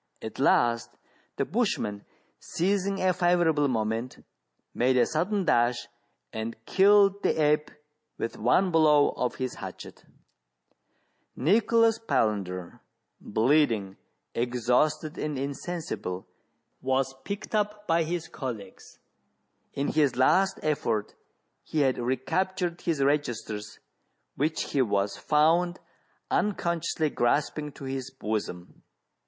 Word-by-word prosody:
At - - -8
last 120 -1 +3 0.5
the - - -1
bushman, 100 -1 -1 0.3
seizing 195 +2 -1
a 185 -1 +2
favourable 175 -5 +2
moment, 115 0 -2 0.5
made 130 +1 +2
a 125 - +5
sudden 185 +5 -1
dash, 120 -4 +2 0.5
and 110 +1 -4
killed 200 0 +5
the - - +1
ape 150 0 +2 0.5
with 115 - -3
one 180 - +2
blow 150 -3 +5
of 125 - -2
his 130 -1 -3
hatchet - - -9 1.3
Nicholas 225 - +3
Palander, 100 - -1 0.4
bleeding, 110 -4 +1 0.4
exhausted, 125 +6 0
and 150 -2 -2
insensible, 140 - -4 0.6
was 135 0 0
picked 200 +2 -6
up 210 0 -1
by 165 -2 +2
his 165 0 -2
colleagues: 115 -9 -8 0.8
in 140 - -1
his 145 -5 +2
last 190 +10 +3
effort 115 -8 -1 0.5
he 155 - -1
had 130 -2 +2
recaptured 175 +8 -1
his 155 -5 0
registers, 120 -7 -2 0.6
which 155 +4 -1
he 140 - +2
was 100 -4 0
found 165 +4 +2 0.5
unconsciously 170 -6 0
grasping 150 +4 0
to - - -12
his 135 -1 -4
bosom. 105 -8 -5
145 Hz, 105 wpm, -27 LUFS, 120-175 Hz, 1.3 s, a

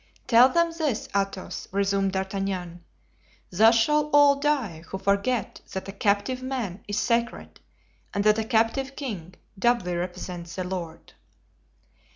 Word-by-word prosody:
"Tell 245 +2 +6
them 335 +3 +2
this, 300 -9 -1
Athos," 195 -1 -3
resumed 195 0 +1
D'Artagnan; 190 -2 -3 0.7
"thus 220 +5 +5
shall 300 +6 +2
all 290 -1 +6
die 275 - -1
who 190 - -5
forget 200 +4 -1
that 190 - -5
a - - -5
captive 205 +6 0
man 245 -8 -4
is 205 0 -2
sacred 235 +2 -1 0.5
and 200 - -1
that 215 +1 +4
a - - 0
captive 230 +5 0
king 190 - -6 0.2
doubly 235 -6 +1
represents 175 -1 -5
the 185 - -3
Lord." 175 -3 -6
205 Hz, 135 wpm, -26 LUFS, 190-255 Hz, 0.7 s, Tell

